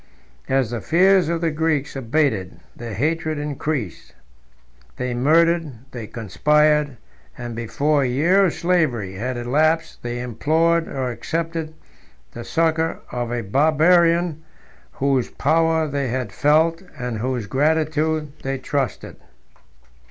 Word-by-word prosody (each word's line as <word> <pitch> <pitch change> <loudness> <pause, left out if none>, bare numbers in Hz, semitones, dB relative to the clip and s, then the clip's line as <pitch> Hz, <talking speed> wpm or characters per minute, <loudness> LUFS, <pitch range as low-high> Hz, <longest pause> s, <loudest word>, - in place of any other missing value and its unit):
As 130 -3 +1
the 120 - -3
fears 185 0 +4
of 170 -1 -1
the 165 -1 +1
Greeks 150 -3 -1
abated, 115 -7 -1 0.2
their 115 -3 -7
hatred 155 +5 -1
increased. 145 - -4 0.8
They 125 -1 -2
murdered; 165 +4 +2 0.2
they 115 -3 -7
conspired; 150 +6 +1 0.4
and 120 -2 -6
before 140 +6 0
a 135 - +1
year 170 +10 +3
of 175 - 0
slavery 150 - 0
had 125 +6 -4
elapsed, 155 +7 0
they 120 0 -4
implored, 160 +7 +1
or 130 -2 -3
accepted, 165 +4 -4 0.6
the 120 - -8
succor 160 +2 0
of 120 -1 -3
a 120 -1 -1
Barbarian, 160 - +3 0.5
whose 135 -2 0
power 160 +2 +1
they 140 -2 -2
had 125 -3 -3
felt, 160 - +2 0.2
and 125 -4 -4
whose 125 -1 -2
gratitude 155 +4 0
they 135 0 -2
trusted. 135 0 -3
150 Hz, 120 wpm, -21 LUFS, 125-160 Hz, 0.8 s, fears